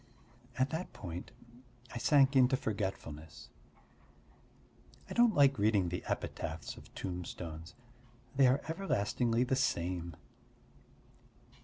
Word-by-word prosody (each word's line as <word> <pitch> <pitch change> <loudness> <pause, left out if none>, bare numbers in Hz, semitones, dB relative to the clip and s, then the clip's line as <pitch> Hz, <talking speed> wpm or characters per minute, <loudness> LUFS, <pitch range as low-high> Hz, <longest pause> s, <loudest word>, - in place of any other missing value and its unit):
At 130 +2 +1
that 165 +3 -4
point 90 -2 -7 0.6
I 120 - -4
sank 140 +1 +4
into 130 0 +5
forgetfulness. 95 - -5 1.6
I - - -6
don't 240 -3 +4
like 140 -2 +5
reading 100 -4 +3
the 90 - -4
epitaphs 80 -2 -4
of - - -14
tombstones: 85 -3 -6 0.6
they 135 -1 +6
are 130 +3 +3
everlastingly 120 - 0
the 130 +1 +1
same. 85 - -1
110 Hz, 105 wpm, -33 LUFS, 85-135 Hz, 1.6 s, they